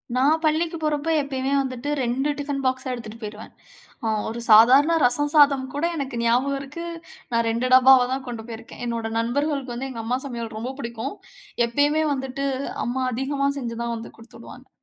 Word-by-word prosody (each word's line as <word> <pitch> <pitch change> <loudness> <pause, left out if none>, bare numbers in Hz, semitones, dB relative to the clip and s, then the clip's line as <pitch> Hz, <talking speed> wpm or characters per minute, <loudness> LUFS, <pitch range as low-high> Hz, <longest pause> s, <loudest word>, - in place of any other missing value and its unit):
நான் 290 +5 +3
பள்ளிக்கு 320 +2 +1
போறப்போ, 305 +1 -1
எப்பயுமே 270 -1 -2
வந்துட்டு 260 +1 -4
2 255 +4 0
டிஃபன் 285 -1 -3
பாக்ஸா 260 0 -1
எடுத்துட்டு 230 -2 -8
போயிடுவன். 215 +1 -8 0.5
அ - - +1 0.2
ஒரு 230 +2 -5
சாதாரண 260 +9 +7
ரசம் 290 +4 +1
சாதம் 280 -3 +5
கூட 290 +4 -1
எனக்கு 275 -4 -4
ஞாபகம் 255 +4 +2
இருக்கு. 295 +5 -7 0.5
நான் 230 0 +2
2 240 +3 -1
டப்பாவா 260 -1 +7
தான் 265 0 -4
கொண்டு 230 -2 -6
போயிருக்கேன். 225 +2 -9
என்னோட 230 -1 -2
நண்பர்களுக்கு 275 +1 -1
வந்து 265 +3 -4
எங்க 230 -3 -5
அம்மா 250 +3 0
சமையல் 235 -4 -5
ரொம்ப 245 +4 -4
புடிக்கும். 235 +1 -5 0.5
எப்பயுமே 290 +5 +2
வந்துட்டு, 270 +1 -4 0.4
அம்மா 255 +2 -1
அதிகமா 275 +3 -1
செஞ்சுதான் 235 -1 -3
வந்து 225 - -9
குடுத்து 230 0 -15
உடுவாங்க. 255 +2 -13
260 Hz, 165 wpm, -23 LUFS, 235-280 Hz, 0.5 s, சாதாரண